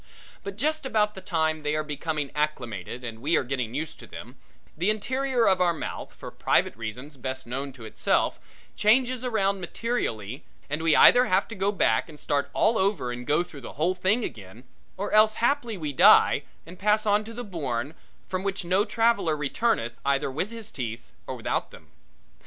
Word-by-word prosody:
But 200 Hz, -1 st, -6 dB
just 310 Hz, +6 st, 0 dB
about 215 Hz, -5 st, +1 dB
the 190 Hz, -, -9 dB
time 160 Hz, -4 st, 0 dB
they 150 Hz, 0 st, -1 dB
are 155 Hz, -, 0 dB
becoming 150 Hz, -1 st, -3 dB
acclimated 125 Hz, -, -3 dB
and 115 Hz, -2 st, -7 dB
we 155 Hz, +6 st, +2 dB
are -, -, +1 dB
getting 125 Hz, -2 st, -3 dB
used 155 Hz, +2 st, -4 dB
to -, -, -12 dB
them, -, -, -10 dB, 0.4 s
the 175 Hz, +6 st, +1 dB
interior 255 Hz, +3 st, +1 dB
of 190 Hz, -2 st, +4 dB
our 175 Hz, -2 st, +3 dB
mouth -, -, -6 dB
for -, -, -9 dB
private -, -, +1 dB
reasons 125 Hz, +6 st, -7 dB
best 130 Hz, +1 st, -4 dB
known 135 Hz, +3 st, -4 dB
to 120 Hz, -4 st, -11 dB
itself 110 Hz, -, 0 dB, 0.4 s
changes 250 Hz, +3 st, +3 dB
around 200 Hz, -5 st, 0 dB
materially 145 Hz, -, -3 dB, 0.3 s
and 150 Hz, +2 st, -1 dB
we 165 Hz, -1 st, +4 dB
either 250 Hz, +1 st, +8 dB
have 185 Hz, -1 st, +2 dB
to -, -, -6 dB
go 195 Hz, -1 st, 0 dB
back 115 Hz, -, +1 dB
and 150 Hz, -2 st, -12 dB
start 140 Hz, 0 st, -1 dB
all 225 Hz, +1 st, +2 dB
over 190 Hz, -10 st, 0 dB
and 120 Hz, 0 st, -7 dB
go 150 Hz, +4 st, +3 dB
through 150 Hz, -5 st, -12 dB
the -, -, -9 dB
whole 165 Hz, +5 st, +1 dB
thing 190 Hz, +6 st, +1 dB
again, 110 Hz, -, -8 dB, 0.3 s
or 200 Hz, +2 st, -3 dB
else 215 Hz, 0 st, +5 dB
haply 240 Hz, -3 st, 0 dB
we 150 Hz, -4 st, -4 dB
die -, -, +6 dB, 0.2 s
and 180 Hz, +3 st, -12 dB
pass 210 Hz, +2 st, +2 dB
on 210 Hz, 0 st, +3 dB
to 225 Hz, -, -9 dB
the 245 Hz, -, -5 dB
bourne 145 Hz, -, -3 dB, 0.3 s
from 185 Hz, 0 st, -2 dB
which 195 Hz, -1 st, -3 dB
no 185 Hz, +4 st, +3 dB
traveller 225 Hz, -9 st, +2 dB
returneth 145 Hz, -, -1 dB
either 140 Hz, 0 st, +1 dB
with 160 Hz, +9 st, -2 dB
his 225 Hz, -1 st, -8 dB
teeth 115 Hz, -3 st, -6 dB, 0.2 s
or -, -, -4 dB
without -, -, -2 dB
them. -, -, -16 dB
170 Hz, 190 wpm, -26 LUFS, 135-215 Hz, 0.4 s, either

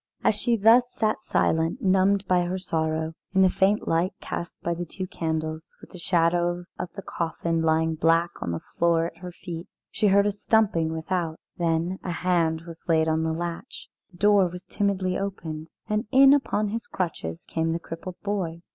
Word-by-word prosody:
As -, -, +4 dB
she 240 Hz, -2 st, +1 dB
thus 235 Hz, +4 st, +5 dB
sat 215 Hz, -1 st, 0 dB
silent, 165 Hz, +5 st, +1 dB
numbed 195 Hz, +1 st, +3 dB
by 180 Hz, -1 st, +3 dB
her 180 Hz, +2 st, -2 dB
sorrow, 160 Hz, -3 st, -1 dB, 0.2 s
in 190 Hz, -, +6 dB
the 185 Hz, -, +5 dB
faint 195 Hz, +3 st, +2 dB
light 170 Hz, +3 st, +1 dB
cast 170 Hz, -, -6 dB
by 170 Hz, -, 0 dB
the 170 Hz, +1 st, -4 dB
two 185 Hz, +3 st, -5 dB
candles, 160 Hz, -4 st, -4 dB
with -, -, -15 dB
the 180 Hz, -, -9 dB
shadow 175 Hz, 0 st, +1 dB
of 180 Hz, -, -4 dB
the 195 Hz, -, -8 dB
coffin 165 Hz, -1 st, -2 dB
lying 160 Hz, 0 st, +2 dB
black 165 Hz, +2 st, +2 dB
on -, -, -3 dB
the 85 Hz, -, -3 dB
floor 170 Hz, -1 st, +1 dB
at 165 Hz, 0 st, -7 dB
her 180 Hz, +1 st, -8 dB
feet, 170 Hz, -1 st, -8 dB, 0.2 s
she 210 Hz, -, +1 dB
heard 200 Hz, +1 st, +5 dB
a 205 Hz, -, +2 dB
stumping 200 Hz, -5 st, +1 dB
without; 160 Hz, 0 st, -2 dB, 0.2 s
then 170 Hz, +2 st, 0 dB
a -, -, -4 dB
hand 170 Hz, -2 st, +1 dB
was 165 Hz, -1 st, -11 dB
laid 160 Hz, -1 st, +3 dB
on 160 Hz, 0 st, +1 dB
the 160 Hz, 0 st, 0 dB
latch, 170 Hz, +7 st, -5 dB, 0.2 s
the 180 Hz, -, -18 dB
door 205 Hz, -1 st, +5 dB
was 180 Hz, +1 st, -9 dB
timidly 190 Hz, -2 st, -1 dB
opened, 165 Hz, -5 st, -5 dB, 0.2 s
and 210 Hz, 0 st, -1 dB
in 270 Hz, +1 st, +8 dB
upon 215 Hz, -7 st, +1 dB
his 230 Hz, +2 st, -4 dB
crutches 85 Hz, -, -4 dB
came 165 Hz, 0 st, -1 dB
the 165 Hz, -, 0 dB
crippled 170 Hz, +2 st, -8 dB
boy. 180 Hz, -5 st, -2 dB
175 Hz, 190 wpm, -26 LUFS, 165-195 Hz, 0.2 s, in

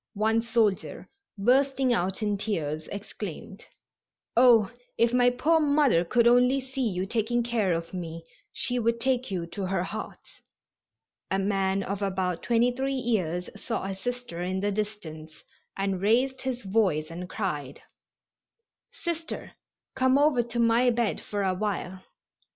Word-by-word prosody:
One 220 Hz, +2 st, +2 dB
soldier, 225 Hz, -4 st, 0 dB, 0.3 s
bursting 265 Hz, +4 st, +3 dB
out 190 Hz, +1 st, -1 dB
in 210 Hz, -1 st, +1 dB
tears, 160 Hz, -7 st, -3 dB
exclaimed: 200 Hz, -1 st, -7 dB, 0.7 s
"Oh, 235 Hz, -3 st, +6 dB, 0.3 s
if 235 Hz, +1 st, +3 dB
my 245 Hz, 0 st, +5 dB
poor 300 Hz, +7 st, +2 dB
mother 285 Hz, -, +3 dB
could 235 Hz, +7 st, +2 dB
only 250 Hz, +3 st, +5 dB
see 265 Hz, -2 st, -2 dB
you 185 Hz, -1 st, -2 dB
taking 235 Hz, +3 st, 0 dB
care 230 Hz, -5 st, 0 dB
of 165 Hz, +1 st, -2 dB
me 165 Hz, -2 st, -6 dB, 0.3 s
she 245 Hz, 0 st, -1 dB
would 230 Hz, 0 st, +1 dB
take 255 Hz, 0 st, 0 dB
you 180 Hz, -4 st, -2 dB
to 190 Hz, +2 st, -5 dB
her 190 Hz, -1 st, 0 dB
heart." 215 Hz, +3 st, -8 dB, 0.9 s
A 195 Hz, -, +1 dB
man 195 Hz, 0 st, 0 dB
of 200 Hz, +1 st, -4 dB
about 185 Hz, -3 st, -1 dB
23 245 Hz, +3 st, +1 dB
years 200 Hz, -10 st, -1 dB
saw 230 Hz, -, -3 dB
a 195 Hz, 0 st, -3 dB
Sister 245 Hz, -4 st, -5 dB
in 185 Hz, +1 st, -1 dB
the 205 Hz, +1 st, 0 dB
distance 175 Hz, -7 st, -6 dB, 0.3 s
and 195 Hz, -1 st, -1 dB
raised 250 Hz, +6 st, +2 dB
his 255 Hz, -2 st, -3 dB
voice 190 Hz, -6 st, +1 dB
and 180 Hz, +2 st, -7 dB
cried: 150 Hz, -12 st, -4 dB, 1.1 s
"Sister, 335 Hz, -2 st, -4 dB, 0.4 s
come 260 Hz, 0 st, +3 dB
over 285 Hz, -3 st, +4 dB
to 235 Hz, 0 st, -5 dB
my 235 Hz, +2 st, +4 dB
bed 235 Hz, -2 st, 0 dB
for 205 Hz, -1 st, -3 dB
awhile." 190 Hz, -1 st, -2 dB
215 Hz, 140 wpm, -27 LUFS, 190-245 Hz, 1.1 s, Oh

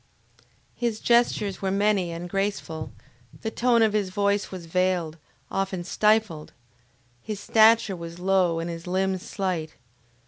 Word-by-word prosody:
His 235 Hz, -3 st, -2 dB
gestures 235 Hz, -4 st, +2 dB
were 195 Hz, -, 0 dB
many 200 Hz, -2 st, +1 dB
and 170 Hz, +1 st, -6 dB
graceful; 195 Hz, -4 st, -3 dB, 0.5 s
the 220 Hz, -, -3 dB
tone 235 Hz, -1 st, +3 dB
of 220 Hz, -2 st, +2 dB
his 205 Hz, -3 st, 0 dB
voice 200 Hz, +1 st, 0 dB
was 185 Hz, -3 st, -8 dB
veiled, 175 Hz, -2 st, 0 dB, 0.3 s
often 195 Hz, -2 st, -2 dB
stifled; 210 Hz, -5 st, +1 dB, 0.7 s
his 210 Hz, -, -5 dB
stature 220 Hz, -1 st, +4 dB
was 170 Hz, -1 st, -8 dB
low, 180 Hz, -2 st, +2 dB
and 165 Hz, -, -3 dB
his 170 Hz, 0 st, -7 dB
limbs 190 Hz, 0 st, 0 dB
slight. 180 Hz, -6 st, -3 dB
190 Hz, 135 wpm, -25 LUFS, 175-210 Hz, 0.7 s, stature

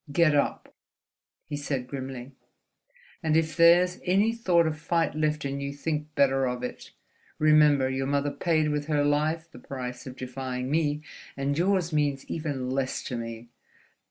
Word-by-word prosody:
"Get 160 Hz, +1 st, +4 dB
up!" 145 Hz, -, -1 dB, 0.7 s
he 145 Hz, -, -5 dB
said, 140 Hz, -3 st, -3 dB
grimly, 130 Hz, -1 st, -6 dB, 0.9 s
"and 160 Hz, -1 st, +2 dB
if 160 Hz, -1 st, 0 dB
there's 175 Hz, +2 st, +5 dB
any 200 Hz, +5 st, +3 dB
thought 180 Hz, -8 st, +3 dB
of 155 Hz, -1 st, -2 dB
fight 165 Hz, +1 st, 0 dB
left 150 Hz, -1 st, -1 dB
in 140 Hz, 0 st, -3 dB
you, 140 Hz, 0 st, -3 dB
think 150 Hz, +1 st, -4 dB
better 135 Hz, -1 st, +3 dB
of 125 Hz, 0 st, -3 dB
it, 125 Hz, -, -6 dB, 0.5 s
remember 150 Hz, -3 st, +5 dB
your 135 Hz, 0 st, -2 dB
mother 145 Hz, +1 st, 0 dB
paid 155 Hz, +1 st, +1 dB
with 150 Hz, 0 st, -2 dB
her 150 Hz, -2 st, +2 dB
life 155 Hz, +3 st, 0 dB
the -, -, -12 dB
price 125 Hz, -1 st, -6 dB
of 130 Hz, 0 st, -8 dB
defying 130 Hz, 0 st, -4 dB
me, 150 Hz, -1 st, 0 dB, 0.3 s
and 140 Hz, +1 st, -1 dB
yours 180 Hz, 0 st, +1 dB
means 145 Hz, -3 st, 0 dB
even 140 Hz, -6 st, -3 dB
less 130 Hz, 0 st, -1 dB
to 125 Hz, -, -4 dB
me. 115 Hz, 0 st, -6 dB
145 Hz, 160 wpm, -27 LUFS, 135-160 Hz, 0.9 s, there's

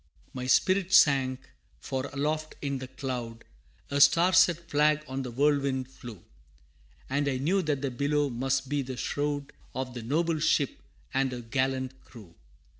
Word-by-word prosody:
My 125 Hz, -1 st, -5 dB
spirit 185 Hz, +6 st, +3 dB
sank, 130 Hz, -3 st, +5 dB, 0.4 s
for 130 Hz, 0 st, -3 dB
aloft 155 Hz, +2 st, -2 dB
in 140 Hz, -2 st, -3 dB
the 130 Hz, -, -7 dB
cloud, 125 Hz, -3 st, -5 dB, 0.5 s
A 140 Hz, 0 st, +1 dB
Star 170 Hz, +6 st, +6 dB
set 170 Hz, -2 st, +4 dB
Flag 150 Hz, 0 st, +2 dB
on 130 Hz, +1 st, -4 dB
the 130 Hz, -, -5 dB
whirlwind 135 Hz, 0 st, 0 dB
flew, 120 Hz, -7 st, -11 dB, 0.8 s
And 140 Hz, +2 st, 0 dB
I 135 Hz, -2 st, 0 dB
knew 175 Hz, +9 st, +1 dB
that 150 Hz, -5 st, -2 dB
the 135 Hz, -, -1 dB
billow 145 Hz, +2 st, 0 dB
must 135 Hz, +2 st, -1 dB
be 145 Hz, +1 st, 0 dB
the 130 Hz, -1 st, -6 dB
shroud 145 Hz, +1 st, -2 dB, 0.2 s
Of 130 Hz, -1 st, -4 dB
the 120 Hz, -, -6 dB
noble 160 Hz, +7 st, 0 dB
ship 150 Hz, -2 st, +1 dB, 0.3 s
and 135 Hz, -1 st, +1 dB
her 125 Hz, -1 st, -5 dB
gallant 130 Hz, +2 st, -2 dB
crew. 105 Hz, -9 st, -14 dB
135 Hz, 160 wpm, -28 LUFS, 130-150 Hz, 0.8 s, Star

